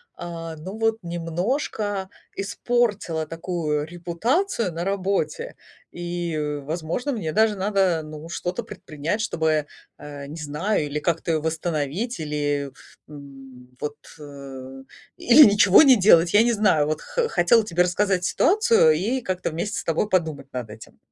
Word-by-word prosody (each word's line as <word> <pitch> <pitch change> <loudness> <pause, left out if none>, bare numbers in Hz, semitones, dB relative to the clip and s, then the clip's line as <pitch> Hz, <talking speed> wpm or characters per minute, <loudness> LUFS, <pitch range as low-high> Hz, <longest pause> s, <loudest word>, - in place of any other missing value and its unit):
а, 165 -1 -7
ну 185 +7 -8
вот 225 0 +1
немножко 190 - -2 0.3
испортила 205 -6 -1
такую 165 -3 -2
репутацию 180 - -1
на 170 +2 -4
работе. 200 - -2 0.4
И, 175 -2 -4 0.3
возможно, 165 - -3
мне 180 - -3
даже 220 -1 +3
надо, 190 -4 +1
ну, 155 +1 -9
что-то 180 +6 -4
предпринять, 185 -3 -5
чтобы, 160 -8 0 0.3
а, 145 -1 -9
не 150 +3 -8
знаю, 150 +4 -1
или 150 +1 -3
как-то 165 -1 -1
восстановить, 160 - -2
или, 145 -2 -2 0.4
м, 135 -3 -13
вот, 150 0 -4 0.2
э, 135 -2 -10 0.3
или 260 +6 +7
ничего 205 +1 +7
не 260 -4 +7
делать. 170 -3 +5
Я 210 +2 +6
не 240 0 +2
знаю, 190 -9 +2
вот 155 - -2
х - - -1
хотела 225 - +3
тебе 180 -3 +2
рассказать 185 +1 0
ситуацию 235 - +4
и 205 +12 0
как-то 185 -6 -3
вместе 205 +6 -3
с - - -6
тобой 165 +5 0
подумать 160 -8 -1
над 125 -4 -5
этим. 105 +1 -13
170 Hz, 140 wpm, -23 LUFS, 155-205 Hz, 0.4 s, или